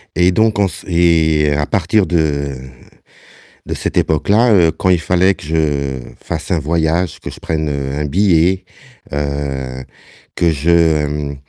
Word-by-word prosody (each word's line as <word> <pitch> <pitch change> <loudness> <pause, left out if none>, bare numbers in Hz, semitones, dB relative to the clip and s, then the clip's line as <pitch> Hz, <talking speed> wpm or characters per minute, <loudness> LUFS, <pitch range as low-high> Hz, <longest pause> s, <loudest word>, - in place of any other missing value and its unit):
et 90 +1 +3
donc 110 +3 +2
on 100 - +4
s 85 - -9
et 80 -4 +2
à 75 0 0
partir 95 +4 +1
de 75 -5 -1 1.1
de - - -3
cette - - -4
époque-là, 105 +10 +2
heu, 85 -5 +4
quand 80 - -3
il 90 -2 +4
fallait 90 +3 +2
que - - -14
je 75 -4 -1 0.2
fasse - - -5
un 90 - +2
voyage, 80 +2 -1
que - - -7
je - - -11
prenne, 80 -1 -2
heu, 70 -1 -3
un 75 - -2
billet, 90 +2 +2 0.5
heu, 70 -3 -3 0.5
que 85 -1 +2
je 75 -2 +1
80 Hz, 150 wpm, -16 LUFS, 75-90 Hz, 1.1 s, on